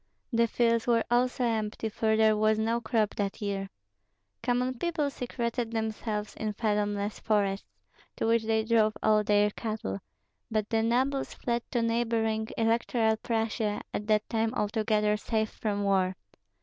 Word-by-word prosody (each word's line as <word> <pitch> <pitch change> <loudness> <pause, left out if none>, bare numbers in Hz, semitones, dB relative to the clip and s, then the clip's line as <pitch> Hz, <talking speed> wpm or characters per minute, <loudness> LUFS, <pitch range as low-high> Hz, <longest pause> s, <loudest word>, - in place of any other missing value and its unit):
The 230 0 +4
fields 230 0 +1
were 230 -1 +3
also 250 +1 +2
empty, 220 -1 -1
for 220 +1 +1
there 220 -1 +5
was 215 0 +3
no 225 +2 0
crop 220 -3 +1
that 200 -1 -2
year. 195 -2 -3 0.7
Common 250 +1 +1
people 320 -5 0
secreted 240 -2 -3
themselves 220 -1 -3
in 215 -1 -2
fathomless 205 -1 -1
forests, 200 -2 0 0.5
to - - -2
which 230 0 +2
they 220 0 +2
drove 220 -1 +2
all 215 -1 +4
their 210 0 +3
cattle; 215 - -4 0.5
but 215 -2 0
the 225 -1 +3
nobles 260 +4 0
fled 235 -1 -1
to 235 - 0
neighboring 225 -1 0
Electoral 225 0 +2
Prussia, 225 -2 -1
at 210 - -3
that 215 0 +2
time 225 0 0
altogether 210 0 +1
safe 220 0 -1
from 205 -2 -2
war. 190 -2 +2
220 Hz, 150 wpm, -29 LUFS, 210-230 Hz, 0.7 s, there